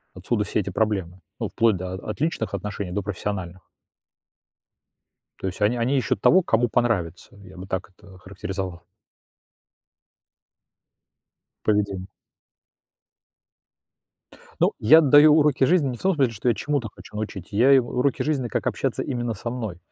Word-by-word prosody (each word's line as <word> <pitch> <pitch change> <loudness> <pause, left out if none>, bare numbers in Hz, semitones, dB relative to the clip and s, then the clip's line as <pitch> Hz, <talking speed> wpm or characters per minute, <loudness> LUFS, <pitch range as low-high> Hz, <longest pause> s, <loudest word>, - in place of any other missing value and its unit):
Отсюда - - -1
все - - -1
эти - - -3
проблемы, 95 -5 -1 0.2
ну, - - -2
вплоть 115 -2 +2
до 90 +1 -5
от 105 +3 -6
личных 135 -10 -1
отношений 100 -1 -5
до 100 +2 -2
профессиональных. 95 -2 -5 1.8
То - - -3
есть 90 - -6
они 105 +4 +2
они 125 +4 +1
ищут 105 -5 -1
того, 185 - +5
кому 120 -7 +1
понравится, 100 -8 -1
я 95 -1 -14
бы 95 +1 -9
так 95 0 -4
это 95 0 -17
охарактеризовал. 95 -2 -6 2.8
Поведение. 100 -3 0 2.5
Ну, - - +3
я 160 +9 +7
даю 145 +1 +7
уроки 150 -3 +3
жизни 155 -1 +3
не 125 - -5
в - - -14
том 190 -2 +2
смысле, 135 -5 +2
что 110 +3 -1
я 120 - +2
чему-то 140 -5 -2
хочу - - -14
научить, 105 -4 -6
я 120 +7 +4
им 130 -3 +5
уроки 125 +2 0
жизни, 140 -5 -1
как - - -2
общаться - - -1
именно 120 -2 -3
со 110 +3 -5
мной. 110 -7 -5
110 Hz, 150 wpm, -24 LUFS, 95-125 Hz, 2.8 s, я